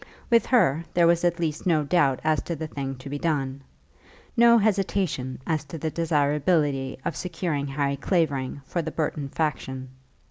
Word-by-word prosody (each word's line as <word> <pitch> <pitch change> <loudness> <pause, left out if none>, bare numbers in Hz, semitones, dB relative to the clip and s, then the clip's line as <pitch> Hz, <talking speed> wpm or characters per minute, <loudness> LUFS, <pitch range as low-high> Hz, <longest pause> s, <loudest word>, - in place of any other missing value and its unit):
With 230 -2 +4
her, 170 - +3
there 175 -1 +5
was 170 0 +3
at 175 0 +1
least 160 0 -2
no 160 -4 +3
doubt 140 -4 +2
as 155 -1 +2
to 170 - -3
the 160 +1 -4
thing 135 -3 -4
to 130 +2 -11
be 145 +1 -4
done, 140 -4 -1 0.7
no 235 -1 +7
hesitation 195 - 0
as 155 -3 0
to 145 +4 -7
the 160 +1 -3
desirability 145 -3 +1
of 160 - -2
securing 165 -5 -2
Harry 140 0 -1
Clavering 140 -5 -1
for 170 - -2
the 160 - -4
Burton 150 -3 -2
faction. 130 -4 -3
155 Hz, 170 wpm, -25 LUFS, 140-170 Hz, 0.7 s, no